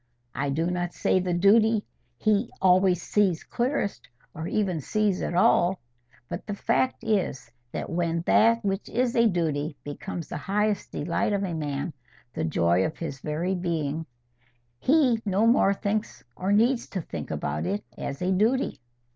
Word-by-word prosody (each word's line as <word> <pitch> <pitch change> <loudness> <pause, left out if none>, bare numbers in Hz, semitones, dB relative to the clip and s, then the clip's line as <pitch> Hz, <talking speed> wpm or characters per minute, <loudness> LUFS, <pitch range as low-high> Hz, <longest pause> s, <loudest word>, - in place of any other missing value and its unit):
I 145 +1 -1
do 165 +5 0
not 175 -1 -2
say - - +2
the 180 0 -1
duty 215 +4 +4 0.3
he 215 - +1
always 185 -1 +4
sees 195 -6 +1
clearest, 240 -4 -2 0.2
or 160 +1 -5
even 185 -7 0
sees 210 +3 0
at 170 - -2
all. 180 0 +4 0.5
But - - -6
the 205 - -3
fact 235 +5 0
is, 190 - -1 0.2
that - - -4
when 170 -1 -1
that 230 +5 +4
which 195 0 -2
is 245 0 0
a 230 0 +5
duty 155 -6 -1
becomes 160 +2 -6
the - - -4
highest 210 +6 -1
delight 180 +7 -1
of 200 0 0
a 180 -3 -2
man, 150 -1 -3 0.4
the - - -2
joy 85 +3 +2
of 160 - -3
his 145 -5 -5
very 160 +6 -2
being, 165 -4 -2 0.7
he 255 - +3
no 200 +1 +2
more 230 -4 +5
thinks 205 +2 -2
or 190 +2 -1
needs 235 +4 +3
to 190 - -3
think 80 - -7
about 75 +2 -2
it 205 +1 -2
as 140 +5 -5
a 185 - +1
duty. 220 - +1
185 Hz, 165 wpm, -26 LUFS, 160-215 Hz, 0.7 s, a